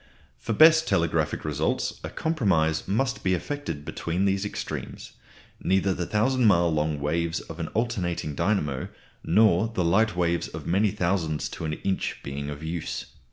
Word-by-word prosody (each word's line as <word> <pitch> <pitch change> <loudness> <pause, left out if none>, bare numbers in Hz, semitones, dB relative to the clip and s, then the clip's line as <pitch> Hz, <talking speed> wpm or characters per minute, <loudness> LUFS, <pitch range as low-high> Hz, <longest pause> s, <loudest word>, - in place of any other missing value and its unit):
For 115 - -2
best 160 +5 +7
telegraphic 80 -2 0
results 75 0 -1
a - - -4
compromise 95 - +1
must 110 +3 0
be 95 0 +2
effected 85 - -5
between 85 +6 -2
these 95 0 +1
extremes, 105 - -6 0.5
neither 95 0 +2
the 85 -1 -3
thousand 125 +4 +2
mile 85 -4 +4
long 75 -1 0
waves 80 +3 -1
of 80 - -10
an 85 - -2
alternating 95 -10 -1
dynamo 75 -5 0 0.4
nor 100 +2 +4
the 100 -6 -1
light 105 +5 +3
waves 85 -1 0
of - - -8
many 100 +4 +2
thousands 85 -4 -1
to - - -6
an 75 - -2
inch 95 +4 -2
being 70 +1 -5
of 75 +1 -7
use. 80 +1 -4
85 Hz, 160 wpm, -26 LUFS, 80-105 Hz, 0.5 s, best